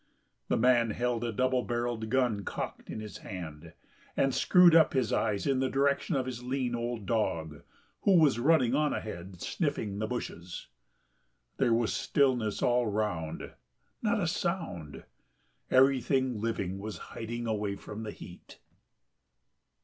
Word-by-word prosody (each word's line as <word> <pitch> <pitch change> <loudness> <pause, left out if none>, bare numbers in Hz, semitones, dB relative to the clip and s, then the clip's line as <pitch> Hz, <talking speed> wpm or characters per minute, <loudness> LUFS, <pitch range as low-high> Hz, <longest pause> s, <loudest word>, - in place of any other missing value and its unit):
The - - +1
man 120 -1 +4
held 120 +1 -1
a 120 - -1
double 130 +3 +1
barrelled 120 -2 -2
gun 125 -6 +1
cocked - - -5
in - - -5
his 105 -1 -8
hand, 80 -3 -8 0.4
and 135 -1 +2
screwed 180 +3 +6
up 160 -2 +6
his 130 -5 +1
eyes 105 -3 0
in 135 -2 +2
the 130 0 +1
direction 140 +4 +1
of 130 -2 0
his 125 -2 -5
lean 125 0 -2
old 120 -2 -3
dog 80 -9 -1 0.4
who 195 -3 +5
was 145 -7 +4
running 130 -3 +4
on 150 +1 +2
ahead 90 -3 -6
sniffing 125 - -2
the 110 - -1
bushes. 90 - -6 0.9
There 120 - +2
was 115 -1 +1
stillness 125 -7 +1
all 120 -1 +3
round, 100 -7 -2 0.5
not 225 0 +1
a 185 - 0
sound... 160 - -3 0.7
everything 130 -2 +3
living 100 -4 -2
was 105 +1 -6 0.2
hiding 120 +1 -4
away 105 -3 -1
from 105 +2 -8
the 110 - -5
heat. 90 -3 -11
120 Hz, 145 wpm, -30 LUFS, 105-130 Hz, 0.9 s, screwed